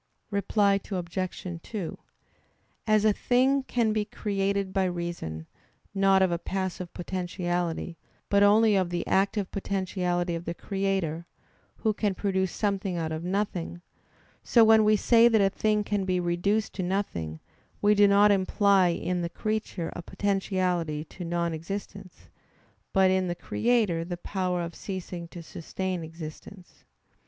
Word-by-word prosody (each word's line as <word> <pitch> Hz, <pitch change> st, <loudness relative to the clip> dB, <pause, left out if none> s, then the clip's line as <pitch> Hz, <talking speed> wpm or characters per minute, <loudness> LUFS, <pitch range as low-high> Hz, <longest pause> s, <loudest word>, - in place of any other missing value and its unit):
Reply 200 Hz, 0 st, +2 dB
Obj. 185 Hz, -1 st, -3 dB, 0.2 s
2: 200 Hz, -5 st, -5 dB, 0.9 s
As 215 Hz, -1 st, +4 dB
a 215 Hz, -, +5 dB
thing 260 Hz, +5 st, +2 dB
can 235 Hz, -4 st, 0 dB
be 215 Hz, -1 st, +1 dB
created 200 Hz, -2 st, -2 dB
by 195 Hz, -1 st, +2 dB
reason, 170 Hz, -, -4 dB, 0.5 s
not 195 Hz, -1 st, +4 dB
of 185 Hz, -, +2 dB
a 170 Hz, -, -1 dB
passive 185 Hz, -1 st, -4 dB
potentiality, 175 Hz, -2 st, -3 dB, 0.3 s
but 200 Hz, 0 st, +3 dB
only 210 Hz, +1 st, +5 dB
of 185 Hz, -2 st, +1 dB
the 175 Hz, 0 st, -2 dB
active 195 Hz, 0 st, +1 dB
potentiality 180 Hz, -3 st, -1 dB
of 170 Hz, +1 st, -4 dB
the 170 Hz, -, -3 dB
Creator, 190 Hz, -5 st, -2 dB, 0.5 s
Who 220 Hz, -2 st, 0 dB
can 205 Hz, -2 st, -1 dB
produce 190 Hz, -2 st, 0 dB
something 195 Hz, -3 st, -1 dB
out 160 Hz, -1 st, -2 dB
of 160 Hz, +1 st, -4 dB
nothing, 180 Hz, -2 st, -2 dB, 0.6 s
so 235 Hz, -, +5 dB
when 220 Hz, 0 st, +6 dB
we 215 Hz, 0 st, +5 dB
say 230 Hz, +3 st, +5 dB
that 225 Hz, -2 st, +4 dB
a 195 Hz, -1 st, +3 dB
thing 210 Hz, +1 st, +1 dB
can 205 Hz, -1 st, -1 dB
be 185 Hz, -1 st, +1 dB
reduced 180 Hz, +5 st, 0 dB
to -, -, -4 dB
nothing, 175 Hz, -, -2 dB, 0.4 s
we 210 Hz, 0 st, +4 dB
do 205 Hz, 0 st, +6 dB
not 200 Hz, +1 st, +6 dB
imply 195 Hz, -1 st, +3 dB
in 175 Hz, +1 st, -1 dB
the 170 Hz, -, -2 dB
creature 215 Hz, -3 st, -3 dB
a -, -, -5 dB
potentiality 180 Hz, -5 st, -1 dB
to 180 Hz, -, -9 dB
non 170 Hz, 0 st, -1 dB
existence, 195 Hz, +3 st, -7 dB, 0.6 s
but 190 Hz, -1 st, +4 dB
in 190 Hz, -1 st, +1 dB
the 175 Hz, -, -2 dB
Creator 215 Hz, -6 st, +1 dB
the 175 Hz, 0 st, -5 dB
power 180 Hz, -1 st, -2 dB
of 170 Hz, 0 st, -5 dB
ceasing 180 Hz, -3 st, -6 dB
to 170 Hz, 0 st, -10 dB
sustain 180 Hz, +2 st, -4 dB
existence. 165 Hz, +4 st, -10 dB
190 Hz, 145 wpm, -27 LUFS, 175-205 Hz, 0.9 s, when